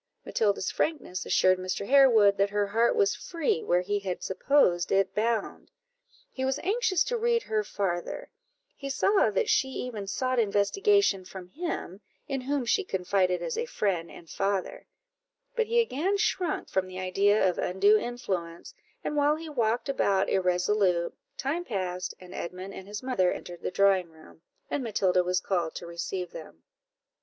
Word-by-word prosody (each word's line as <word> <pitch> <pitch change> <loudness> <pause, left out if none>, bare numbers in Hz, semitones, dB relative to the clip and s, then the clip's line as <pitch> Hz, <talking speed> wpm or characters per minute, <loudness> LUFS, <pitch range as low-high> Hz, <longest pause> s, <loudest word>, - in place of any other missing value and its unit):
Matilda's 200 -4 0
frankness 290 - -2
assured 185 0 +3
Mr. 185 +2 -3
Harewood 235 -7 +6
that 200 +1 +2
her 205 0 0
heart 225 +4 +2
was 415 -2 +3
free 330 - -1
where 175 +1 +2
he 205 +3 -1
had 190 -3 -4
supposed 185 -4 +2
it 195 0 +2
bound; 225 -1 -1 0.6
he 260 - -4
was 265 +1 0
anxious 400 -2 +2
to - - -2
read 470 0 +2
her 215 -1 -1
farther; 195 - -3 0.4
he 275 - -6
saw 390 +9 +3
that 470 - 0
she 265 - +3
even 245 -6 -5
sought 255 +4 0
investigation 215 - +2
from 185 -1 -10
him, 255 - -5 0.3
in 270 -2 -2
whom 275 0 -1
she 390 - +2
confided 185 - 0
as 485 - -3
a 475 - -2
friend 185 - -1
and 170 - -13
father; 195 -1 -2 0.7
but 460 -2 +1
he 470 +1 +2
again 390 - +1
shrunk 365 -5 -1
from 190 -1 -1
the 185 0 -9
idea 195 +2 +2
of 180 - -1
undue 195 +4 +3
influence, 190 - -5 0.3
and 300 - -2
while 295 +1 +3
he 320 0 -8
walked 235 -4 0
about 200 -8 +1
irresolute, 180 -1 +1 0.2
time 310 +6 -2
passed, 185 - -3
and 180 -1 -12
Edmund 185 +3 -6
and 190 - -9
his 205 +2 -6
mother 245 -9 +1
entered 175 -1 -7
the - - -2
drawing 190 -2 +3
room, 160 0 -18 0.3
and 280 - -2
Matilda 190 -5 +2
was 180 +1 +1
called 175 -5 -2
to - - -6
receive 170 +1 -4
them. 120 - -11
205 Hz, 165 wpm, -28 LUFS, 185-275 Hz, 0.7 s, Harewood